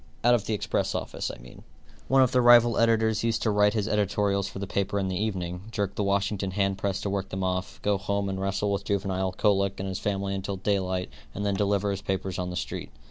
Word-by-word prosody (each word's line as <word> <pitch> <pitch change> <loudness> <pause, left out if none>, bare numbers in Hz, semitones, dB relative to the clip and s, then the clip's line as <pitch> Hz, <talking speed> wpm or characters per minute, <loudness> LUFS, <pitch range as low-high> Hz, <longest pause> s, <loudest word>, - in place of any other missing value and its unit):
Out 120 +1 +6
of 110 -4 +1
the 110 - +1
express - - -1
office, - - -3
I - - -7
mean. - - -14 0.5
One 135 0 +5
of 130 - +2
the 125 - +3
rival 120 -1 +6
editors 110 -1 +3
used 115 -1 0
to 110 - +2
write 105 +1 +3
his 105 -2 0
editorials 100 -1 +1
for - - -8
the 100 - -3
paper 100 +1 -1
in 95 -1 0
the 95 - -2
evening, 90 -3 -3
jerk 100 -3 -2
the 105 - -1
Washington 100 0 0
hand 95 0 0
press 100 -2 -1
to 100 - -2
work 100 -1 -2
them 95 0 -3
off, 90 0 -2
go 100 -1 +2
home 100 0 -1
and 95 -1 -3
wrestle 100 +1 0
with 100 0 -1
juvenile 95 -2 -1
colic 100 0 +1
in 95 - -3
his 95 -1 -3
family 100 -1 -1
until 95 0 -3
daylight 95 -2 -1 0.2
and 100 - -3
then 100 - +1
deliver 100 0 +1
his 100 - -4
papers 95 -1 -3
on 90 0 -2
the 90 - -5
street. - - -4
100 Hz, 240 wpm, -27 LUFS, 95-105 Hz, 0.5 s, Out